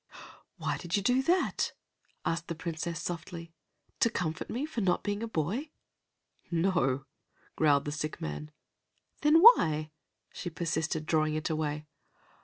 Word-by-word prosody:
"Why - - -1
did 175 +2 -1
you 200 - -1
do 250 +4 +3
that?" 350 +7 +1 0.5
asked 165 0 -1
the 170 - -3
Princess 165 0 -4
softly. 165 0 -6 0.5
"To 230 - +4
comfort 160 -8 -3
me 255 +5 -2
for 305 -7 -4
not 180 -3 +1
being 205 0 -2
a 230 - -2
boy?" 220 - -2 0.8
"No," 165 -6 +1 0.5
growled 145 -3 +3
the 145 - -2
sick 155 0 -4
man. 75 0 -5 0.7
"Then 300 +3 +6
why?" 155 - +7 0.4
she 175 - -5
persisted, 160 -2 -2
drawing 155 -1 +2
it 155 +1 -1
away. 150 -1 -2
165 Hz, 140 wpm, -30 LUFS, 155-200 Hz, 0.8 s, why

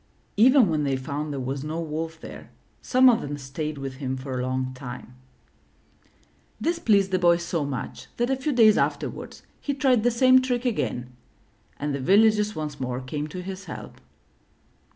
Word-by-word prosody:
Even 250 +2 +6
when 155 -3 0
they 135 -2 0
found 145 +3 -4
there 140 - -4
was 135 +2 -3
no 155 +2 -4
wolf 160 0 -4
there, - - -10 0.3
some 260 +1 +4
of 240 -3 +5
them 145 0 -5
stayed 145 +2 -5
with 135 -1 -6
him 130 -2 -3
for 130 -1 -5
a - - -1
long 130 0 -2
time. 125 -1 -9 1.5
This 335 0 -1
pleased 200 - +3
the 185 - +2
Boy 175 -1 +5
so 170 -2 -2
much 140 -3 -5
that 240 +2 0
a - - +3
few 265 +3 -2
days 225 -5 +5
afterward, - - -3 0.2
he 285 - -3
tried 260 -4 +3
the 240 - +3
same 255 +2 +5
trick 250 -1 -1
again, 125 - -2 0.6
and 145 0 -2
the 140 - -2
villagers 210 +6 +3
once 150 -2 -5
more 125 -1 -3
came 145 +4 -4
to 180 +4 -7
his 190 +1 -7
help. 160 - -9
160 Hz, 180 wpm, -25 LUFS, 135-225 Hz, 1.5 s, Even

